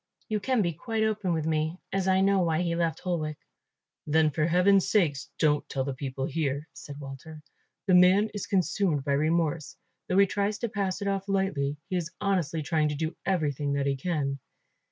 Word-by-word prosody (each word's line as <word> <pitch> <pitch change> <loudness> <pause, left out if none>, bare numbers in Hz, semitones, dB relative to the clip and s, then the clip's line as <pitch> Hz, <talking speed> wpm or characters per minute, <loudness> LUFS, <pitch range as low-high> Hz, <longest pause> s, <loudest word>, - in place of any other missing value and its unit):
You 215 -1 0
can 250 0 +1
be 170 -2 -1
quite 220 +7 -2
open 215 -4 0
with 160 -2 -1
me, 160 +1 0 0.2
as 190 -1 0
I 190 0 +4
know 195 0 +3
why 165 -1 +1
he 170 -1 0
left 170 -1 -1
Holwick." 155 -5 -2 0.7
"Then 155 0 +3
for 150 +2 0
heaven's 185 +3 +4
sake 170 -9 +3 0.2
don't 150 -2 +1
tell 135 - -1
the 135 0 -3
people 135 0 -4
here," 145 0 -2
said 145 0 -9
Walter. 150 +3 -9 0.4
"The 190 - +2
man 185 +4 +5
is 205 -2 -4
consumed 180 -5 +1
by 140 - -2
remorse, 155 +1 0 0.3
though 185 - +2
he 200 - +7
tries 200 +1 -1
to 235 - -3
pass 200 -2 -2
it - - -2
off 195 0 -2
lightly. 175 -8 0
He 185 - -1
is 170 -2 -3
honestly 175 -6 0
trying 155 +1 +1
to 150 - -2
do 160 +3 -3
everything 145 -6 0
that 140 0 0
he 140 -1 +1
can. 140 -2 -2
165 Hz, 195 wpm, -28 LUFS, 150-195 Hz, 0.7 s, he